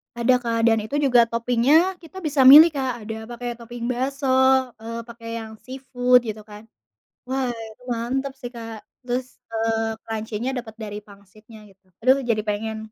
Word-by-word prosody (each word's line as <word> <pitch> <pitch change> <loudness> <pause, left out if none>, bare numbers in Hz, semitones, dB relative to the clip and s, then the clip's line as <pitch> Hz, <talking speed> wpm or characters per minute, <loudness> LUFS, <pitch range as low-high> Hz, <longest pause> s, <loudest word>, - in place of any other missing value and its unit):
Ada, 240 +2 +3
Kak, 230 -1 -2
dan 225 -1 +4
itu 215 +7 -5
juga 240 -3 +5
topping-nya 250 +11 +2
kita 355 +2 -14
bisa 295 -3 +1
milih, 305 +5 +11
Kak. 265 -3 -2
Ada 220 +1 -6
pake 240 0 -6
topping 235 0 -9
bakso, 270 +2 -3 0.5
eee, 230 +1 -6
pake 235 0 -12
yang 220 0 -9
seafood 255 -1 +1
gitu 215 0 -5
kan. 210 0 -12 0.6
Wah, 260 -1 -1
itu 225 +1 -10
mantep 265 +4 -2
sih, 245 -2 -8
Kak. 225 -2 -8 0.2
Terus, 250 +1 -4
eee, 225 0 -1
crunchy-nya 220 +2 -4
dapet 225 -3 -7
dari 210 -2 -7
pangsitnya 210 +2 -17
gitu. 190 0 -30 0.2
Aduh 260 +2 +5
jadi 215 -2 +1
pengen. 220 +1 -3
235 Hz, 165 wpm, -23 LUFS, 220-260 Hz, 0.6 s, milih